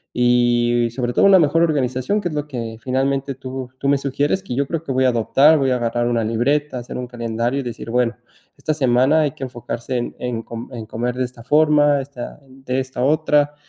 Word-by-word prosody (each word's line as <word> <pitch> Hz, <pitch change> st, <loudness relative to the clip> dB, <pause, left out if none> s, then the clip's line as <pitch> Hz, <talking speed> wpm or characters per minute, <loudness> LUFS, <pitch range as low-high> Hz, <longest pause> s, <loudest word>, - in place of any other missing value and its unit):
y 120 Hz, -1 st, +3 dB
sobre 120 Hz, 0 st, -2 dB
todo, -, -, +4 dB
una 195 Hz, -1 st, +7 dB
mejor 165 Hz, +1 st, +3 dB
organización, 140 Hz, +4 st, 0 dB
que 180 Hz, -, -2 dB
es 155 Hz, -, -6 dB
lo 150 Hz, 0 st, -3 dB
que 115 Hz, -5 st, -5 dB
finalmente 135 Hz, +2 st, -1 dB
tú 130 Hz, -1 st, -7 dB
tú 140 Hz, -, -2 dB
me 140 Hz, 0 st, +4 dB
sugieres 140 Hz, +7 st, -1 dB
que 195 Hz, -, -5 dB
yo 140 Hz, +1 st, 0 dB
creo 165 Hz, +1 st, -3 dB
que 145 Hz, -, -5 dB
voy 130 Hz, 0 st, +2 dB
a 130 Hz, -, +5 dB
adoptar. 135 Hz, +6 st, +4 dB
Voy 135 Hz, -1 st, +1 dB
a 125 Hz, -, +2 dB
agarrar 120 Hz, 0 st, -1 dB
una 115 Hz, -2 st, +1 dB
libreta, 130 Hz, +6 st, 0 dB
hacer 120 Hz, -, -7 dB
un 125 Hz, -, -5 dB
calendario, 120 Hz, +2 st, -2 dB
y -, -, -7 dB
decir: 120 Hz, -1 st, -7 dB
"Bueno, 120 Hz, 0 st, +1 dB, 0.4 s
esta 155 Hz, -, -1 dB
semana 130 Hz, +2 st, +3 dB
hay 150 Hz, -2 st, +1 dB
que 135 Hz, -, -9 dB
enfocarse 125 Hz, 0 st, -4 dB
en 120 Hz, -, -4 dB
en 120 Hz, -2 st, -3 dB
com 115 Hz, +1 st, -8 dB
en 115 Hz, -2 st, -6 dB
comer 120 Hz, +3 st, -3 dB
de 130 Hz, -, -1 dB
esta 125 Hz, -1 st, -11 dB
forma, 145 Hz, +1 st, +4 dB
esta 135 Hz, -1 st, -8 dB
de 130 Hz, 0 st, -4 dB
esta 130 Hz, -1 st, -3 dB
otra". 150 Hz, 0 st, +2 dB
130 Hz, 220 wpm, -20 LUFS, 120-145 Hz, 0.4 s, una